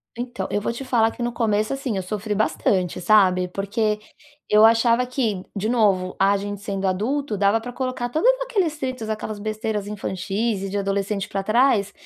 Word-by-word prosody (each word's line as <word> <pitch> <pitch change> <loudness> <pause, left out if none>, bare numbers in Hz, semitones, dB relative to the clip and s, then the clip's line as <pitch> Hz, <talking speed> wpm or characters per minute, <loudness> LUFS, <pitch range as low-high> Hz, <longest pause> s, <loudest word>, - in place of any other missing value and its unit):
Então, 245 0 -4
eu 205 - 0
vou 230 - -1
te 260 +3 -7
falar 230 -3 +3
que 240 - -6
no 240 - -1
começo 215 0 0
assim, 265 -7 -3
eu 190 - -2
sofri 210 +2 -3
bastante, 190 -4 0
sabe, 185 -2 +4
porque 210 +3 -1 0.5
eu 210 +1 +5
achava 230 +2 +4
que, 225 -8 -1
de 205 +2 -1
novo, 200 -6 +2
a 200 +1 +4
gente 205 0 -5
sendo 195 -1 -3
adulto 220 +7 -1
dava 200 +3 +3
pra 245 +2 -8
colocar 255 -2 -3
todos 320 - +3
aqueles 390 -11 0
atritos, 255 -6 -4
aquelas 215 -1 -4
besteiras 215 -1 -3
infantis 200 +1 -2
e 195 - -4
de 205 - -2
adolescente 195 0 -1
pra 195 - -2
trás, 215 -2 +2
215 Hz, 185 wpm, -23 LUFS, 200-240 Hz, 0.5 s, eu